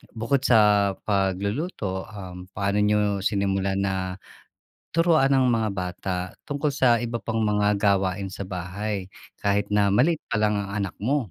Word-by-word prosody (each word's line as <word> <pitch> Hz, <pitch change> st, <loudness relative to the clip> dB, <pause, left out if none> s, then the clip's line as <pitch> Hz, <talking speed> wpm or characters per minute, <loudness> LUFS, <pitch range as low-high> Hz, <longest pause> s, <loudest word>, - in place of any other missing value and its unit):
bukod 115 Hz, +5 st, +1 dB
sa 105 Hz, -6 st, +4 dB
pagluluto, 100 Hz, -, -1 dB
um, 90 Hz, -4 st, -9 dB
paano 100 Hz, 0 st, 0 dB
niyo 105 Hz, -1 st, +2 dB
sinimulan 95 Hz, -1 st, 0 dB
na 95 Hz, -1 st, -2 dB, 0.8 s
turuan 160 Hz, -5 st, +3 dB
ang 130 Hz, -1 st, +4 dB
mga 115 Hz, -3 st, +1 dB
bata 90 Hz, 0 st, -3 dB, 0.3 s
tungkol 145 Hz, +1 st, -2 dB
sa 130 Hz, -5 st, +3 dB
iba 120 Hz, -1 st, -3 dB
pang 115 Hz, -1 st, -2 dB
mga 105 Hz, -1 st, +2 dB
gawain 100 Hz, -1 st, +1 dB
sa 95 Hz, +1 st, -6 dB
bahay 95 Hz, +2 st, -4 dB, 0.3 s
kahit 100 Hz, 0 st, 0 dB
na 105 Hz, -1 st, +3 dB
maliit 140 Hz, +11 st, +3 dB
palang 105 Hz, -1 st, +1 dB
ang 100 Hz, -, -4 dB
anak 95 Hz, -, -5 dB
mo? 130 Hz, +8 st, +1 dB
105 Hz, 145 wpm, -25 LUFS, 95-115 Hz, 0.8 s, sa